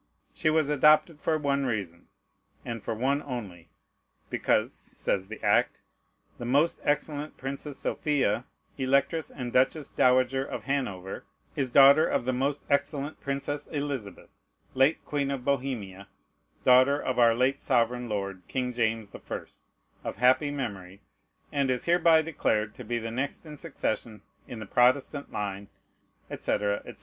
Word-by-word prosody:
She 155 - +1
was 155 -2 +2
adopted 150 +2 +4
for 160 - +1
one 140 -2 0
reason, 95 -8 -4 0.6
and 115 -2 -5
for - - -3
one 135 +5 +1
only, 105 - -7 0.6
because, - - +1
says 95 -1 -3
the 110 +1 -8
act, - - +2 0.6
"the - - -6
most 145 +7 +2
excellent 145 0 -1
Princess 135 +2 -6
Sophia, 130 -6 0 0.3
Electress 140 +4 +1
and 125 -3 -6
Duchess 135 +3 +2
Dowager 130 +1 +3
of - - -6
Hanover, 100 -10 -3 0.3
is 135 -2 0
daughter 140 +4 +7
of 120 - 0
the 130 - 0
most 140 +3 -1
excellent 145 +1 -1
Princess 140 +1 -3
Elizabeth, 140 - -5 0.4
late 135 +4 +2
Queen 140 -2 -1
of 135 -3 -4
Bohemia, 120 -9 -2 0.6
daughter 130 +3 +5
of 130 -3 -2
our 115 -1 +6
late 130 +3 +1
sovereign 125 -1 +1
lord 100 -3 -3
King 125 -1 -2
James 110 -3 -1
the - - -10
First, - - -8 0.4
of - - -4
happy 130 +4 +3
memory, 100 -9 -5 0.5
and 140 -2 +1
is 125 -1 -1
hereby 170 -2 +5
declared 110 -9 0
to 125 - -10
be 120 +1 -2
the 115 0 -4
next 135 +7 -3
in 150 -1 -9
succession 120 -8 -4 0.2
in 120 - -7
the 110 - -7
Protestant 130 +6 +2
line," 100 -1 -4 0.6
&c., - - -4
&c. 105 - 0
130 Hz, 145 wpm, -28 LUFS, 115-145 Hz, 0.6 s, daughter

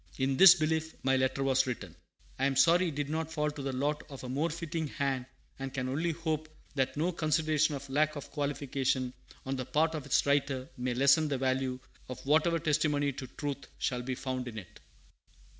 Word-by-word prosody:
In 135 0 +1
this 185 +3 +10
belief 160 -1 -1
my 135 0 +3
letter 130 +1 +1
was 130 -1 +2
written. 125 - -5 0.4
I 135 - +2
am 135 - -1
sorry 170 +6 +5
it 155 - -4
did 145 -1 -2
not 160 +1 -2
fall 150 -1 0
to 150 - -7
the 135 0 -2
lot 145 +3 -1
of 135 -2 -9
a 125 - -6
more 145 +6 0
fitting 165 -1 -3
hand; 135 -3 -2 0.3
and 135 0 -4
can 130 -1 -1
only 160 +6 0
hope 155 -1 -3 0.2
that 135 0 -1
no 165 +4 +1
consideration 155 -2 +1
of 140 0 -7
lack 155 +3 +1
of 145 - -8
qualification 140 -3 -1 0.3
on 135 0 -2
the 130 - -3
part 160 +2 +2
of 150 -3 -5
its 135 - +3
writer 140 -2 +1
may 125 -1 -2
lessen 140 +4 +5
the 140 -2 -1
value 130 0 0 0.3
of 125 - -7
whatever 160 +4 +3
testimony 150 -3 +1
to 135 -1 -7
truth 140 0 -5
shall 125 -1 -1
be 130 +1 -3
found 130 -1 -4
in 115 -2 -7
it. 95 -5 -10
140 Hz, 205 wpm, -31 LUFS, 130-155 Hz, 0.4 s, this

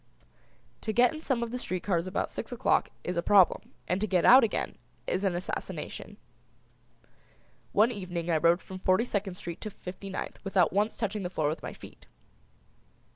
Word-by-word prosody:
To 220 - -2
get 245 +5 +4
in 310 - -7
some 260 -6 0
of 235 - -4
the 250 - -3
street 185 -6 -3
cars 180 -3 0
about 185 - -2
six - - -6
o'clock - - +2
is 180 0 -3
a - - +2
problem, 190 -1 +4 0.2
and 180 +3 0
to 215 - +1
get 180 -3 +2
out 255 +1 +9
again 225 - -1 0.3
is 185 - -1
an 190 -3 +1
assassination. 180 +2 -5 1.5
One 220 +4 +4
evening 180 -5 -4
I 160 - +3
rode 170 +3 +3
from 190 0 -8
Forty 185 +5 +3
second 200 -5 -2
Street 175 -1 -7
to 215 - -4
Fifty 190 0 -9
ninth 190 - -6
without 190 -4 +2
once 210 +3 +1
touching 210 -2 -2
the 180 - -3
floor 155 -5 0
with 155 - -4
my - - -6
feet. - - -14
190 Hz, 185 wpm, -29 LUFS, 180-215 Hz, 1.5 s, out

